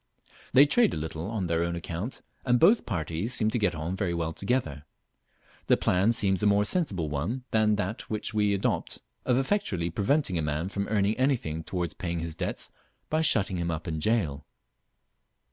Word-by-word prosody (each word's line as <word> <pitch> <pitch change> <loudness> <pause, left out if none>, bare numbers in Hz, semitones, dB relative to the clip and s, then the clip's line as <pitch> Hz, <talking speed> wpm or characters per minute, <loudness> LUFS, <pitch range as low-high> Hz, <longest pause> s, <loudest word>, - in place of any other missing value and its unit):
They 140 +3 +8
trade 230 +10 +3
a - - -3
little 80 +3 -4
on 110 -5 -2
their 85 -1 0
own 85 0 -1
account, 85 +7 -5 0.2
and 125 -1 +3
both 205 - +5
parties 85 +4 -2
seem 110 -2 +2
to 120 - 0
get 95 -5 +1
on 80 +4 -3
very 95 -3 -1
well 80 -1 -2
together. 100 - -1 0.8
The - - +5
plan 95 +5 +2
seems 100 -5 +1
a 105 - +3
more 105 0 +4
sensible 105 - 0
one 85 - -3
than 110 -1 +3
that 105 +1 -4
which 110 +1 -3
we 105 -1 +2
adopt, 100 - -1 0.2
of 125 - +3
effectually 130 - 0
preventing 100 - +1
a - - 0
man 75 +4 -2
from 100 0 -3
earning 105 0 +1
anything 120 - 0
towards 85 -2 -3
paying 85 -2 -3
his 85 -1 -4
debts 80 - -4 0.4
by 155 +1 +2
shutting 105 - +3
him 85 0 -2
up 85 +2 -4
in 80 -2 -2
a - - -3
jail. 75 -8 0
95 Hz, 190 wpm, -28 LUFS, 85-115 Hz, 0.8 s, They